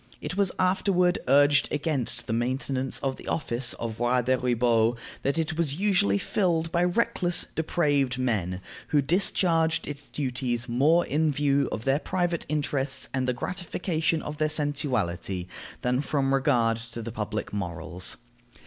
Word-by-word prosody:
It 150 +4 -5
was 195 -2 +2
afterward 185 -1 +2
urged 145 +2 +4
against 140 -5 -1
the 115 - -3
maintenance 130 +2 0
of 135 -1 -2
the - - -12
office 120 -5 0
of 115 -1 -5
Roi 120 +1 +2
des 130 +2 +2
ribauds 120 -2 +2 0.2
that 140 +3 0
it 160 0 -1
was 145 -4 +1
usually 180 - +2
filled 165 - 0
by 170 +1 +2
reckless, 180 -2 +1
depraved 145 -5 +1
men, 100 -8 -1 0.3
who 145 -2 +2
discharged 165 0 +2
its 145 0 -7
duties 125 -3 -2
more 150 +8 +3
in 155 +2 +1
view 140 -1 +1
of 110 - -4
their 135 +2 +2
private 175 -1 -2
interests 145 -2 -1
and 130 -1 0
the 125 - +1
gratification 165 +1 -2
of 150 0 -6
their 155 0 +1
sensuality 125 - -1 0.4
than 125 +1 +1
from 135 -2 0
regard 125 -5 +2
to 115 0 -7
the 115 - -5
public 105 -1 -4
morals. 90 -2 -3
140 Hz, 150 wpm, -26 LUFS, 120-160 Hz, 0.4 s, urged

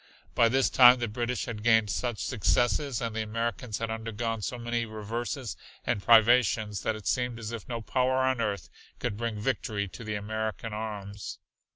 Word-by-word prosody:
By 115 - +4
this 130 +2 +2
time 125 -1 +8
the 120 -1 -2
British 120 +3 -2
had 115 -3 -5
gained 110 -2 +4
such 120 0 -2
successes 120 +3 +1
and 115 -2 -3
the 110 - 0
Americans 115 0 -3
had 115 -1 -3
undergone 115 0 -3
so 125 - -3
many 120 0 -1
reverses 115 +3 -4 0.3
and 120 -4 0
privations 110 -2 +4
that 110 - -1
it 110 - -10
seemed 125 -2 0
as 115 -1 -6
if 115 -1 -7
no 115 -1 -3
power 130 +3 +1
on 130 -2 +2
earth 105 -3 -2 0.3
could - - -2
bring 115 -1 -3
victory 105 -3 -1
to 115 - -10
the 110 -1 -3
American 110 +1 -3
arms. 105 -2 -5
115 Hz, 180 wpm, -28 LUFS, 105-120 Hz, 0.3 s, time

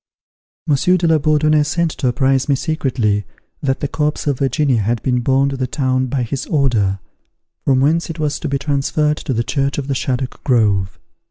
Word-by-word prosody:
Monsieur 160 +5 +3
de 175 - -1
la 160 -1 +4
Bourdonnais 155 0 +3
sent 160 +2 0
to 130 - -2
apprise 130 +2 +1
me 140 - +4
secretly 130 -9 -1 0.4
that 135 -1 -1
the 145 - 0
corpse 150 0 -2
of 140 -4 0
Virginia 135 -3 +1
had 115 +3 0
been 125 -1 +1
borne 135 +3 +2
to 135 - -3
the 130 -1 -1
town 130 -2 0
by 130 0 -1
his 130 +3 -4
order, 120 - +1 0.7
from 130 -2 +3
whence 160 +5 +1
it 165 - -5
was 150 -2 -1
to 160 - -4
be 140 - 0
transferred 150 +2 0
to - - -5
the 115 -2 0
church 140 +2 -1
of 140 - -2
the 140 - 0
Shaddock 130 -1 -3
Grove. 105 -7 +1
135 Hz, 195 wpm, -18 LUFS, 125-150 Hz, 0.7 s, la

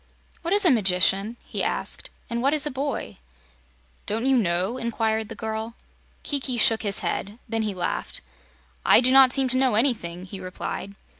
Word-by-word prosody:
"What 335 - -4
is 405 0 +4
a 340 - +7
magician?" 195 0 +2
he - - -5
asked, - - +1 0.2
"and 235 0 -3
what 275 +4 +2
is 300 - +2
a 300 - -2
boy?" 275 +2 -4 0.9
"Don't 225 +4 -2
you 270 0 +3
know?" 190 +1 0
inquired 220 -2 -1
the 225 - -7
girl. 220 +1 -5 0.5
Kiki 270 -4 -2
shook 225 -1 +5
his 200 -2 +1
head. 205 +3 -3
Then 225 0 -1
he 210 -3 -3
laughed. 175 -1 -1 0.6
"I - - +6
do 255 +1 +2
not 265 -1 +7
seem 270 0 +2
to 255 - +1
know 260 -4 +2
anything," 200 -8 -1
he 190 +1 -9
replied. 185 +2 -6
225 Hz, 175 wpm, -24 LUFS, 200-260 Hz, 0.9 s, a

